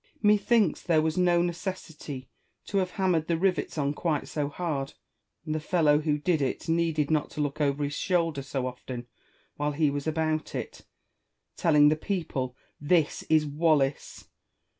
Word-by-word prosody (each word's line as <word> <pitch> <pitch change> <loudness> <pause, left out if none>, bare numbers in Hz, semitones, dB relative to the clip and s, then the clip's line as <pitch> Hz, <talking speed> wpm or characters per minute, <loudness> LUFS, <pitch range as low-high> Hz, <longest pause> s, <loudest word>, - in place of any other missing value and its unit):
Wallace. - - -33
Methinks 210 -2 +3
there 165 -3 +2
was 160 0 0
no 175 -1 +3
necessity 170 -6 -5 0.4
to 200 - 0
have 185 -1 0
ham 190 0 0
mered 160 -1 0
the 170 - +1
rivets 180 -3 0
on 145 -1 0
quite 155 -2 -1
so 145 -2 -2
hard; 145 -4 -3 0.5
and 155 - -2
the 155 - -1
fellow 150 -2 +3
who 150 -1 0
did 160 0 +1
it 135 - -2
needed 165 -2 +1
not 155 -1 +1
to - - -9
look 145 +1 -2
over 145 0 +1
his 145 0 -2
shoulder 165 -3 0
so 135 -1 -3
often 125 -1 -6 0.5
while 150 0 -1
he 150 -1 +2
was 145 +1 -4
about 155 0 -1
it, - - -6 0.7
telling 150 -3 +5
the 155 - +3
people, 155 -8 -3 0.2
" - - -39
This 160 -4 +1
is 155 -1 +4
Wallace." 145 -2 0
155 Hz, 175 wpm, -28 LUFS, 145-170 Hz, 0.7 s, telling